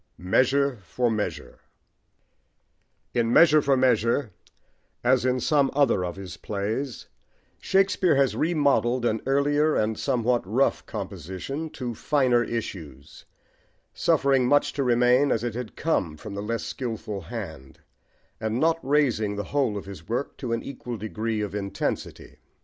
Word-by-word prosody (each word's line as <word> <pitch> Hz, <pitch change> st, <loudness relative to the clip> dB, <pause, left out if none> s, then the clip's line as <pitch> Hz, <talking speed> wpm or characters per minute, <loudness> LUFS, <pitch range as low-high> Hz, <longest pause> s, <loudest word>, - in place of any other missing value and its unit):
"MEASURE 130 Hz, +8 st, +2 dB
FOR 120 Hz, +6 st, -1 dB
MEASURE" 105 Hz, -2 st, -4 dB, 1.5 s
IN 115 Hz, -1 st, +1 dB
Measure 155 Hz, +2 st, +6 dB
for 140 Hz, -1 st, +2 dB
Measure, 120 Hz, -1 st, +2 dB, 0.7 s
as 125 Hz, +1 st, +3 dB
in 130 Hz, 0 st, +1 dB
some 140 Hz, 0 st, +2 dB
other 135 Hz, -10 st, +3 dB
of 90 Hz, -1 st, -4 dB
his 95 Hz, -3 st, -8 dB
plays, 110 Hz, +4 st, -4 dB, 0.5 s
Shakespeare 190 Hz, -3 st, +2 dB
has 135 Hz, -1 st, +2 dB
remodelled 140 Hz, -6 st, +1 dB
an 110 Hz, -2 st, 0 dB
earlier 145 Hz, +3 st, +2 dB
and 110 Hz, 0 st, 0 dB
somewhat 120 Hz, 0 st, +1 dB
rough 115 Hz, +9 st, +1 dB
composition 135 Hz, -, -5 dB
to 125 Hz, -2 st, -4 dB
"finer 125 Hz, -1 st, +2 dB
issues," 80 Hz, -, -7 dB, 0.7 s
suffering 140 Hz, -6 st, +2 dB
much 145 Hz, +1 st, +3 dB
to 140 Hz, -, -2 dB
remain 125 Hz, +3 st, +3 dB
as 115 Hz, -, 0 dB
it 120 Hz, -2 st, -2 dB
had 120 Hz, -2 st, -6 dB
come 90 Hz, -, -1 dB
from 100 Hz, -, -8 dB
the 100 Hz, -, -4 dB
less 115 Hz, +2 st, -3 dB
skilful 110 Hz, -5 st, -5 dB
hand, 65 Hz, -5 st, -8 dB, 0.6 s
and 110 Hz, +2 st, -2 dB
not 165 Hz, +2 st, +2 dB
raising 125 Hz, -7 st, +1 dB
the 105 Hz, -, -3 dB
whole 130 Hz, -8 st, +1 dB
of 100 Hz, -, -7 dB
his 95 Hz, -3 st, -11 dB
work 120 Hz, +5 st, -2 dB
to 125 Hz, -4 st, -5 dB
an 115 Hz, 0 st, -1 dB
equal 125 Hz, -3 st, -6 dB
degree 110 Hz, +1 st, -3 dB
of 105 Hz, -1 st, -4 dB
intensity. 100 Hz, -1 st, -4 dB
120 Hz, 140 wpm, -25 LUFS, 105-140 Hz, 1.5 s, Measure